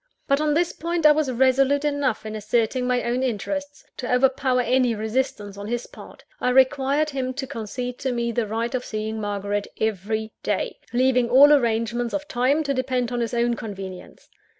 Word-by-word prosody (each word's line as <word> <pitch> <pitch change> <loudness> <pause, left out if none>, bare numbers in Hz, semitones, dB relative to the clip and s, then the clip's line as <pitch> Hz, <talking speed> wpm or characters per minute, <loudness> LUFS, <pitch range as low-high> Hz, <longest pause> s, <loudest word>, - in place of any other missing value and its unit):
But 275 +2 +2
on 300 -1 +1
this 345 +2 +1
point, 335 0 -2
I 300 - +9
was 300 -3 +1
resolute 265 +3 +3
enough 285 -7 0
in 215 0 -5
asserting 230 +4 0
my 250 -1 +1
own 240 +2 -1
interests, 285 +4 -3
to 250 - -4
overpower 255 0 +2
any 250 -1 +2
resistance 215 -2 -2
on 205 - -6
his 240 +1 -2
part. - - -14 0.2
I - - +1
required 270 +3 +3
him 260 -2 -3
to 270 0 -3
concede 245 +2 -5
to 260 - -1
me 235 -1 -1
the 230 -1 -1
right 230 +3 -2
of 255 -1 -1
seeing 220 -1 -4
Margaret 205 0 -2
every 220 +1 -2
day 205 -2 -2
leaving 250 0 +2
all 280 +4 +8
arrangements 235 -2 +1
of 295 0 -4
time 275 +3 +1
to 280 -2 -1
depend 255 -2 -1
on 245 - -2
his 235 0 -2
own 235 0 +2
convenience. 195 -4 -8
250 Hz, 185 wpm, -23 LUFS, 220-270 Hz, 0.2 s, I